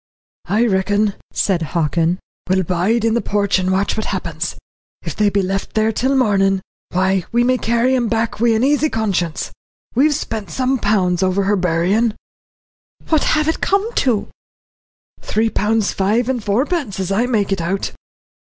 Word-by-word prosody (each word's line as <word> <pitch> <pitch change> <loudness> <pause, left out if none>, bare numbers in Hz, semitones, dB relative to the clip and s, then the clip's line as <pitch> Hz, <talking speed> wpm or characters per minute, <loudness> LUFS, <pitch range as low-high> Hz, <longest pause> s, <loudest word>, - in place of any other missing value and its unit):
"I 220 +4 +2
reckon," 205 0 +1 0.2
said 185 -4 0
Hockin, 165 +2 0 0.3
"we'll 190 0 +2
bide 185 +7 +1
in 225 - +2
the 235 - +1
porch 200 -2 +1
and 185 0 0
watch 190 +2 +1
what 220 - -3
happens. - - -3 0.5
If - - -5
they 210 -1 +3
be 200 -1 +1
left 195 +1 -3
there 220 0 +2
till 260 +5 0
mornin', 195 -5 +2 0.3
why 190 0 +1
we 240 +1 +3
may 255 +1 +2
carry 235 +3 +2
'em 240 -2 +1
back 225 -1 -1
wi' 230 -1 +3
an 220 - +1
easy 295 +3 +2
conscience. 190 - -1 0.4
We've 290 +4 +3
spent 220 -7 -4
some 260 0 0
pounds 190 -4 +1
over 190 +1 +1
her 205 +2 +2
buryin'." 185 +5 +1 0.9
"What 315 -2 +2
have 305 0 +1
it 320 - -1
come 400 +4 +1
to?" 225 -5 +1 0.9
"Three 220 +1 0
pounds 215 +1 +1
five 215 +5 +1
and 250 -4 -1
fourpence, 245 - -1
as 190 0 -2
I 225 +5 +1
make 210 -5 0
it 195 -3 0
out." 190 +4 -2
210 Hz, 170 wpm, -19 LUFS, 190-235 Hz, 0.9 s, they